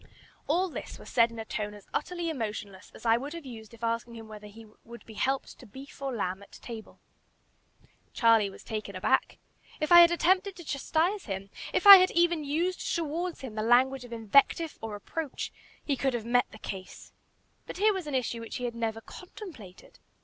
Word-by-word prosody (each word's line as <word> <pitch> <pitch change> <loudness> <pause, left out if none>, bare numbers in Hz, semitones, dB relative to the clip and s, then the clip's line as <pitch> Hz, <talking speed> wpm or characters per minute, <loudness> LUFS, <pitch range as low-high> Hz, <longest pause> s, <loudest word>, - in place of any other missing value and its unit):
All 355 +5 +2
this 345 - -7
was - - -12
said 230 -1 +4
in 230 - -11
a 225 - -5
tone 210 -1 -4
as 205 - -14
utterly 345 +2 -2
emotionless 210 -7 -6
as - - -13
I 225 0 +5
would 280 +5 -6
have 335 -3 -8
used 220 -4 -10
if 230 -1 -15
asking 230 +1 -2
him 225 -1 -10
whether 210 -1 -10
he 220 +2 -13 0.2
would 235 -1 -12
be 225 - -12
helped 265 +5 -2
to 250 - -13
beef 270 +6 -12
or 275 -1 -2
lamb 195 -5 -3
at 200 - -16
table. 225 -3 -10 1.1
Charlie 225 -3 +4
was 195 - -13
taken 215 -3 -5
aback. 185 - +1 0.4
If 305 +2 -2
I 345 - +11
had 340 - +8
attempted 370 +3 +2
to 345 - -10
chastise 330 +7 -1
him, 195 0 -5 0.2
if - - 0
I 400 -1 +14
had 370 0 +4
even 340 -2 +2
used 335 +6 -1
towards 335 +2 -3
him 260 -5 -7
the 215 - -3
language 250 +3 +3
of 245 - -12
invective 275 +8 +2
or 225 -1 -5
reproach, 275 +8 -5 0.3
he 285 - +1
could 265 -1 0
have 225 -2 -4
met 245 +1 +2
the - - -13
case. 190 -2 -9 0.5
But - - -7
here 420 +2 +4
was 375 -5 -5
an 290 - -3
issue 240 -2 -1
which 230 - -7
he 250 - -5
had 240 - -3
never 225 -1 -3
contemplated. 290 - -12
245 Hz, 205 wpm, -29 LUFS, 220-325 Hz, 1.1 s, I